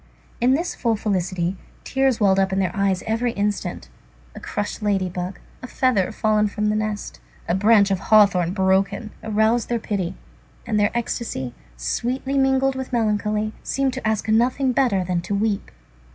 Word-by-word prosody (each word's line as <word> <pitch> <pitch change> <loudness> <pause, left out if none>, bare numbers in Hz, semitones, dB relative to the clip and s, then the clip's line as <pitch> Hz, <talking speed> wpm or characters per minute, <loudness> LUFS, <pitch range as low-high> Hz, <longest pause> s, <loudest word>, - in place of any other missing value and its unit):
In 255 +2 +4
this 340 +4 -2
full 230 -2 0
felicity, 185 -3 -1 0.3
tears 270 -3 +1
welled 195 -2 +4
up 190 0 +2
to 190 - -2
their 190 -1 0
eyes 195 -2 +1
every 230 +2 0
instant. 205 0 -2 0.5
A - - -9
crushed 205 +2 -4
lady 195 -3 0
bug, 180 +1 -5 0.2
a 255 - -7
feather 245 -8 +1
fallen 215 -1 +2
from 210 +1 -1
a - - 0
nest, 215 -1 -3 0.3
a - - +1
branch 205 +1 +4
of 190 - +1
hawthorn 195 -5 +4
broken, 195 +2 +1
aroused 220 +2 +1
their 240 - +1
pity, 195 -5 -3 0.5
and 215 -2 0
their 205 0 +3
ecstasy, 220 - -3 0.2
sweetly 250 - -2
mingled 270 0 +3
with 265 -1 -5
melancholy, 215 -2 0
seemed 270 -1 -1
to 260 -4 -3
ask 220 -1 0
nothing 250 +4 +2
better 235 -7 +2
than 180 -1 -1
to 200 +4 -3
weep. 205 0 -1
210 Hz, 165 wpm, -22 LUFS, 195-235 Hz, 0.5 s, In